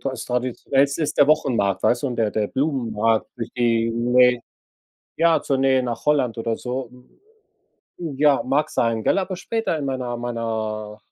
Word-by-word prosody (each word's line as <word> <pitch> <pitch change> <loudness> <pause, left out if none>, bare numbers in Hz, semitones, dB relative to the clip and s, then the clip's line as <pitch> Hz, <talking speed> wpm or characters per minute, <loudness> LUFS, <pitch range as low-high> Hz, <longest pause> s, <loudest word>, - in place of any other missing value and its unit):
das 130 -3 -3
traditionellste 135 +4 0
ist 150 - -2
der 145 - +6
Wochenmarkt, 120 -10 +1
weißt 120 +2 +2
du, - - +2
und 125 -3 -3
der 110 -2 +1
der 105 0 -1
Blumenmarkt 115 -6 0
durch 115 - -5
die 115 -1 +2
Nähe 125 +1 +3 0.7
ja, 165 -1 +3
zur 135 - 0
Nähe 130 -1 +3
nach 120 -2 -4
Holland 140 -6 +1
oder 115 0 -2
so. 125 -1 -5 1.1
Ja, 145 -4 +2
mag 150 +2 0
sein, 115 -1 0
gell, - - +3
aber 185 -1 -3
später 225 -3 -2
in 140 - -3
meiner 130 -2 -3
meiner 110 -3 -4
125 Hz, 160 wpm, -22 LUFS, 115-140 Hz, 1.1 s, der